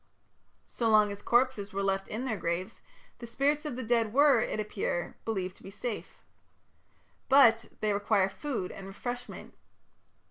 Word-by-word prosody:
So 230 -2 -1
long 215 -1 +5
as 200 0 -7
corpses 240 -4 +1
were 195 0 -1
left 195 0 0
in 235 +5 -4
their 235 -4 -1
graves, 185 +2 -3 0.4
the 235 - -8
spirits 290 +6 0
of 295 - -3
the 255 - -4
dead 230 -1 +1
were, 280 0 +5
it - - -1
would - - -3
appear, 205 -4 -3
believed 190 -4 -3
to - - -19
be - - -10
safe. 210 +3 -6 1.1
But 230 -5 +6
they 210 -1 +1
required 200 -1 +2
food 250 -7 -4
and 195 - -9
refreshment. 245 +5 -7
220 Hz, 165 wpm, -30 LUFS, 195-245 Hz, 1.1 s, But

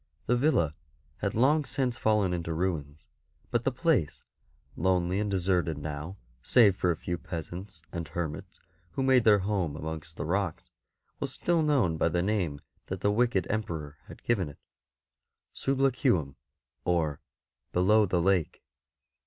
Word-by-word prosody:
The 120 - +2
villa 120 - +2 0.4
had - - -2
long 145 +7 +4
since 130 -3 -1
fallen 105 -6 +2
into 85 -2 -2
ruins; 80 -4 -2 0.5
but 120 -1 0
the 135 - +3
place, 130 - +1 0.5
lonely 90 +1 +1
and 105 0 -1
deserted 90 -4 +1
now 75 +5 -5 0.2
save 105 - +5
for 90 - 0
a 85 - +2
few 85 +2 -4
peasants 85 +1 -7
and 85 -2 -4
hermits 75 0 -5 0.3
who 135 - -1
made 130 -3 +4
their 105 -2 +7
home 95 -6 -1
amongst 80 +1 -6
the - - -3
rocks, 95 0 -2 0.5
was - - -2
still 170 -2 +1
known 135 - +2
by 85 - +2
the 85 +1 0
name 90 -8 -1 0.3
that - - -4
the 100 - +3
wicked 115 -3 +2
Emperor 80 -9 -3
had - - -12
given 100 -9 +1
it 70 - -13 0.5
— - - -59
Sublaqueum, 130 - +1 0.5
or 80 -5 0 0.3
'' - - -56
below 105 +4 +4
the 90 0 +1
lake." 95 -4 +1
95 Hz, 155 wpm, -29 LUFS, 80-110 Hz, 0.5 s, their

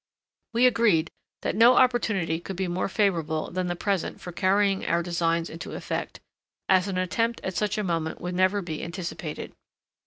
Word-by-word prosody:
We 235 +2 +4
agreed 215 -9 +3 0.3
that - - -1
no 235 +4 +7
opportunity 210 -11 +2
could 190 +2 -7
be 190 +1 -2
more 180 +2 -1
favourable 165 -7 0
than 185 0 -2
the 175 - -1
present 195 -1 -2
for 180 - -7
carrying 195 +2 +2
our 170 +1 +1
designs 170 -1 0
into 165 - -8
effect, - - -4 0.5
as 185 0 +4
an 190 -2 -2
attempt 230 +6 0
at 190 - -3
such 210 0 0
a 210 - 0
moment 165 -3 -2
would 180 +1 -4
never 185 +2 +2
be 160 -3 -5
anticipated. 170 -3 -5
185 Hz, 175 wpm, -26 LUFS, 170-205 Hz, 0.5 s, no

